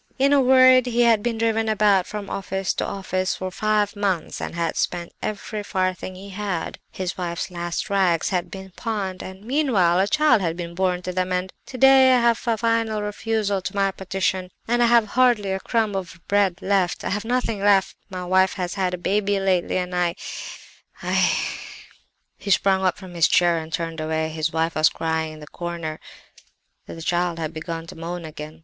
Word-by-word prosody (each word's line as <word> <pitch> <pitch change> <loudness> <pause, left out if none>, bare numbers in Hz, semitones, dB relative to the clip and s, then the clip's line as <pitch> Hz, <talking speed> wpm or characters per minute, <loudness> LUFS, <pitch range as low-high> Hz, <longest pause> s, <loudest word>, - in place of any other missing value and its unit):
In 275 +1 +3
a 280 - +5
word 255 -1 +6
he 240 0 +1
had 230 -3 +4
been 230 0 -1
driven 225 0 +1
about 205 -3 +3
from 210 -1 -6
office 195 -1 -2
to - - -2
office 185 -1 -2
for 185 0 -5
five 210 +1 0
months 195 -5 -2
and - - -5
had 170 -1 -1
spent 175 -1 -2
every 215 0 -4
farthing 185 -2 -2
he 195 +2 -10
had; 195 -4 -4
his 185 -1 -5
wife's 175 +1 -3
last 175 -1 -3
rags 185 -4 +2
had 180 -2 0
just 175 - -23
been 190 0 -9
pawned; 200 -5 -3
and 190 +1 -9
meanwhile 225 - +2
a 195 - +3
child 300 -5 +4
had 165 -2 -1
been 170 -1 -5
born 180 0 0
to 180 - -3
them 185 0 -1
and—and 180 +1 -2
today 265 0 +6
I - - +4
have 235 -1 +2
a 230 -1 +2
final 225 -2 0
refusal 210 -1 -1
to 185 - -5
my 195 -1 +2
petition, 190 -1 -2 0.2
and 240 +1 +2
I 240 - +5
have 235 -1 +5
hardly 240 -6 +3
a 190 - -1
crumb 220 -1 0
of 185 -3 -5
bread 200 -2 +1
left—I 190 -2 0
have 205 +2 -1
nothing 235 -2 -1
left; 200 -1 +3
my 185 -2 -5
wife 190 +1 +3
has 180 -2 -3
had 185 -2 -1
a - - -9
baby 200 +2 0
lately—and 185 -1 0
I—I—' 175 -1 -2 1.0
"He - - -6
sprang 190 0 +3
up 185 -2 +1
from 185 -3 -11
his 170 -1 +4
chair 175 -2 +3
and 160 0 -8
turned 165 0 -3
away. 160 0 -1
His 160 0 -2
wife 165 +1 0
was 155 0 +4
crying 160 -1 -2
in 155 - -11
the - - -8
corner; 170 -1 -5 0.9
the 165 - -8
child 175 0 0
had 160 -1 -4
begun 165 0 -5
to - - -11
moan 170 +1 -5
again. 155 0 -9
190 Hz, 195 wpm, -23 LUFS, 175-210 Hz, 1.0 s, word